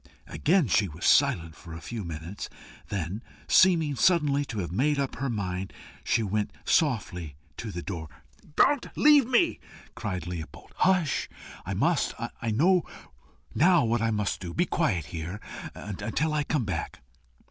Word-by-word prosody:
Again 170 -2 +2
she 105 0 +3
was 80 0 -7
silent 80 -2 +3
for 85 -2 -10
a - - -7
few 115 +3 -6
moments; 85 +3 -6 0.4
then, 100 +2 -3 0.3
seeming 165 -6 +5
suddenly 145 -3 +3
to 115 - -6
have 90 -4 -3
made 140 +10 +1
up 140 -1 -2
her 135 0 -2
mind, 95 -4 -3 0.4
went 105 -1 -1 0.2
softly 90 - 0 0.2
to 115 - -5
the 85 -2 -5
door. 85 -5 -5 0.5
"Don't 290 -3 +3
leave 295 -4 +6
me!" 260 +7 +2 0.3
cried 95 -5 -4
Leopold. 80 -3 -7
"Hush! 180 -6 +2 0.4
I - - -2
must. - - +1 0.3
I 115 - -1
know 175 - +4 0.7
now 175 -4 +4
what 115 +1 +1
to 105 -3 0
do. 85 -2 -7
Be 175 - +2
quiet 105 - 0
here 85 +7 -6 0.4
until 105 - -2
I 150 -1 0
come 145 -7 0
back." 85 -6 -4
110 Hz, 145 wpm, -27 LUFS, -, 0.7 s, leave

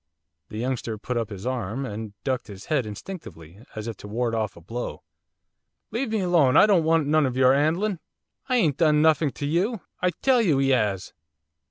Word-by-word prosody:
The 105 - -7
youngster 120 -2 -2
put 125 +4 -4
up 115 -3 -1
his 100 -1 -8
arm, 125 0 -2
and 105 -2 -6
ducked 130 -2 -2
his 100 -2 -10
head, 135 -7 0
instinctively, 105 - -9
as 110 +1 -5
if 115 - -5
to - - -10
ward 115 +2 -1
off 110 -2 -2
a - - -12
blow. 115 +9 -6 0.9
'Leave 235 +3 -2
me 220 -2 0
alone! 170 -8 +4
I - - +8
don't 195 -6 +4
want 160 -1 +3
none 150 0 +3
of 130 0 -4
your 130 0 +5
'andling! 165 +7 +1 0.5
I 255 - +2
ain't 160 - +2
done 150 -2 +4
nuffink 155 -2 +3
to 145 - -4
you! 185 +8 0 0.2
I 180 - +3
tell 250 +8 +2
you 160 -11 +2
'e 135 0 +3
'as! 105 -6 0
135 Hz, 200 wpm, -25 LUFS, 110-165 Hz, 0.9 s, I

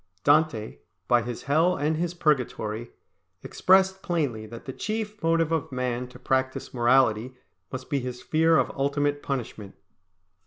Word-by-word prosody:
Dante, 145 -7 +2 0.3
by 120 -1 +4
his 120 0 -6
Hell 160 +6 +3
and 150 +2 0
his 175 +2 -2
Purgatory, 120 -8 -1 0.5
expressed 190 0 +3
plainly 140 -11 -2
that 115 +1 -10
the 130 - -6
chief 215 - -4
motive 165 -1 +2
of 160 -3 -1
man 125 -1 -2
to 125 - -14
practise 130 0 -1
morality 120 -1 +3 0.4
must 130 -1 -6
be 140 - 0
his 125 -1 -5
fear 160 +3 +3
of - - +1
ultimate 145 +1 0
punishment. 115 -7 -5
140 Hz, 145 wpm, -26 LUFS, 125-160 Hz, 0.5 s, by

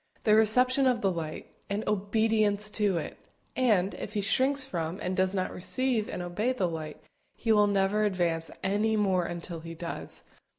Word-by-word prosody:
the 215 - +4
reception 250 +5 +4
of 245 -3 +2
the 195 - +2
light, 160 -3 -5 0.2
and 205 +2 -2
obedience 210 0 +1
to 205 -5 +1
it; 160 - -5 0.4
and, 210 -7 +2
if 210 - -7
he - - +1
shrinks 260 +7 +2
from 170 -6 -3
and 185 +1 -2
does 185 +1 +1
not 185 -1 -1
receive 240 +3 -1
and 180 - -4
obey 205 +8 -1
the 235 -8 0
light, 160 -2 -6 0.4
he 225 - -1
will 210 -1 +5
never 200 +1 +2
advance 170 -5 0
any 210 +3 +1
more 190 -4 +2
until 170 0 -5
he 165 +1 -8
does. 170 0 -7
200 Hz, 175 wpm, -29 LUFS, 175-220 Hz, 0.4 s, will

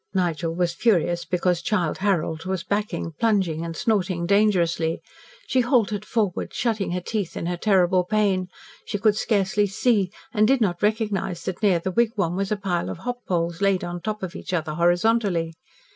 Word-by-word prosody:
Nigel 170 -2 0
was 175 -1 0
furious 175 -4 +1
because 180 -1 0
Childe 175 -2 -1
Harold 175 -4 0
was 185 -2 -2
backing, 190 -4 -2
plunging, 190 -8 +1
and 165 -1 -5
snorting 190 -6 0
dangerously. 170 -5 +2 0.5
She 260 - +2
halted 220 -4 +1
forward, 210 -7 -1
shutting 220 -4 0
her 180 - 0
teeth 205 -1 -3
in - - -3
her 175 +1 -1
terrible 185 -1 +3
pain. 195 -2 +1 0.4
She - - -2
could 210 0 +3
scarcely 205 -1 +1
see, 200 -1 +1 0.2
and 215 -2 +4
did 270 +1 +3
not 180 -6 0
recognise 210 -5 -1
that 185 - -4
near 200 -5 +4
the 185 +3 -3
wigwam 210 -5 +1
was 195 +1 -2
a 215 - +1
pile 185 -4 -2
of - - -5
hop 245 +6 -5
poles 170 0 -1
laid 195 -2 +2
on 175 0 -5
top 210 +2 -4
of 185 -2 -5
each 185 - -6
other 160 -3 -1
horizontally. 175 0 +2
190 Hz, 175 wpm, -24 LUFS, 175-210 Hz, 0.5 s, and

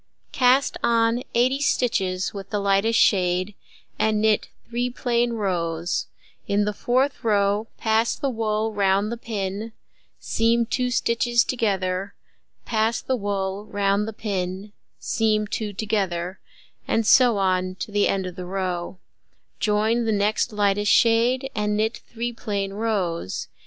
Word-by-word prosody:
Cast 260 +1 +3
on 230 0 +2
80 255 +3 +3
stitches 195 -10 0
with 195 -1 -8
the 210 - -1
lightest 200 +3 +2
shade, 185 0 +2 0.5
and 215 -1 +2
knit 215 -1 +2 0.2
3 240 +1 -1
plain 240 -1 0
rows: 175 -5 -1 0.4
in 205 +1 +2
the 210 - -1
fourth 255 +6 0
row 205 0 +1
pass 220 +1 +1
the 280 - -2
wool 220 -1 -1
round 200 +1 +1
the 235 - -3
pin, 215 -1 -4 0.5
seam 230 +1 +1
2 250 +2 -1
stitches 235 0 +2
together, 195 -6 -1 0.5
pass 220 0 +1
the 260 - -1
wool 200 -2 -3
round 200 +1 +1
the - - -3
pin, 195 -1 -4 0.3
seam 215 -1 +1
2 210 0 -3
together, 190 -4 -2 0.5
and 225 - +1
so 240 0 +5
on 185 -1 0
to 205 - -6
the 205 0 +2
end 190 -1 0
of 180 -1 -6
the 180 -1 -7
row; 185 -1 -3 0.6
join 220 +3 +1
the 225 - +1
next 210 +3 +1
lightest 205 0 +1
shade, 240 +3 +3
and 210 0 0
knit 220 +2 0
3 235 +1 -4
plain 200 -3 -3
rows. 195 - -2
210 Hz, 140 wpm, -24 LUFS, 195-230 Hz, 0.6 s, so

